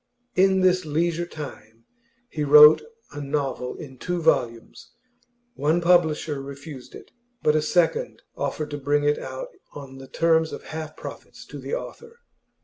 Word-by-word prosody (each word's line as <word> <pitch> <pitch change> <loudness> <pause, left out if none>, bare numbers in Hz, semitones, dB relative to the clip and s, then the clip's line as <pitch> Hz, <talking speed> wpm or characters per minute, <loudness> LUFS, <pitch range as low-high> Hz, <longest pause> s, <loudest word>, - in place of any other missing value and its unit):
In 190 0 +3
this 185 0 +3
leisure 165 +2 -1
time 115 -8 -10 0.4
he 155 -10 -4
wrote 150 +1 +8 0.3
a 145 - -7
novel 140 -3 -3
in 130 -4 -11
two 180 -1 -2
volumes; 120 -8 -1 0.6
one 160 - +1
publisher 160 -4 +2
refused 140 -1 -10
it, - - -13 0.3
but 150 - +3
a 155 - +3
second 175 - 0
offered 155 -1 -3
to 145 - -4
bring 145 +1 +1
it 145 0 +2
out - - -7 0.2
on 135 -2 -10
the 135 - -11
terms 160 0 +2
of - - -7
half 155 0 -7
profits - - -10
to - - -10
the - - -3
author. 470 -1 -9
155 Hz, 150 wpm, -24 LUFS, 140-175 Hz, 0.6 s, wrote